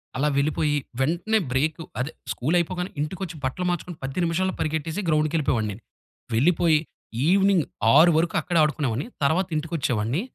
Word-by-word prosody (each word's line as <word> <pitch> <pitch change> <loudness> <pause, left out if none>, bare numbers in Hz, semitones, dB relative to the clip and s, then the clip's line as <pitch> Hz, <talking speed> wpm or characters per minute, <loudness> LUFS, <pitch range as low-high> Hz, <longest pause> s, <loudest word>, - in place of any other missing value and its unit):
అలా 140 +3 +1
వెళ్ళిపోయి 150 +1 +1 0.2
వెంటనే 175 +11 +1
బ్రేకు 155 +5 0 0.2
అదే 135 +5 -2 0.2
స్కూలు 150 +8 -1
అయిపోగానే 180 +2 -2
ఇంటికొచ్చి 175 +3 -4
బట్టలు 130 +8 -2
మార్చుకొని 175 -1 -3
10 135 +7 -2
నిమిషాల్లో 185 +3 0
పరిగెట్టేసి 160 +4 -2
గ్రౌండ్‌కెళ్ళిపోయేవాడిని. 150 -9 +1 0.6
వెళ్ళిపోయి 160 +5 +3 0.5
ఈవినింగ్ 195 -3 +4 0.3
6 170 +2 +7
వరకు 165 +1 +1
అక్కడే 175 -2 0
ఆడుకునేవాడిని. 145 - -1 0.2
తర్వాత 170 +6 +2
ఇంటికొచ్చేవాడిని. 145 - -1
160 Hz, 130 wpm, -24 LUFS, 140-175 Hz, 0.6 s, 6